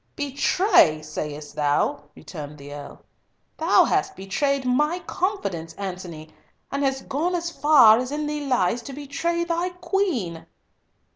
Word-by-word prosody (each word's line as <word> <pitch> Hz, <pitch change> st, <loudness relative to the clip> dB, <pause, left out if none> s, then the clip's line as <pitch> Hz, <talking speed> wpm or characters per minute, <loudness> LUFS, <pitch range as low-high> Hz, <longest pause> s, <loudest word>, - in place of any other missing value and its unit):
"Betray, 285 Hz, -, +3 dB
sayest 150 Hz, -1 st, -6 dB
thou!" 145 Hz, 0 st, 0 dB
returned 150 Hz, -3 st, -9 dB
the 145 Hz, 0 st, -10 dB
Earl. 145 Hz, -1 st, -10 dB, 0.5 s
"Thou -, -, +4 dB
hast -, -, 0 dB
betrayed 270 Hz, +8 st, -1 dB
my 300 Hz, +7 st, +2 dB
confidence, 275 Hz, -, -3 dB
Antony, 180 Hz, -5 st, -7 dB, 0.4 s
and 280 Hz, +1 st, -1 dB
hast 270 Hz, -1 st, -1 dB
gone 330 Hz, +6 st, -1 dB
as 340 Hz, 0 st, -2 dB
far 260 Hz, -9 st, +6 dB
as 255 Hz, +1 st, -3 dB
in 300 Hz, +1 st, -2 dB
thee 295 Hz, 0 st, -3 dB
lies 240 Hz, -2 st, +1 dB
to 270 Hz, +4 st, -9 dB
betray 295 Hz, +5 st, -2 dB
thy 340 Hz, +1 st, -1 dB
Queen." 350 Hz, -, -2 dB
265 Hz, 135 wpm, -24 LUFS, -, 0.5 s, far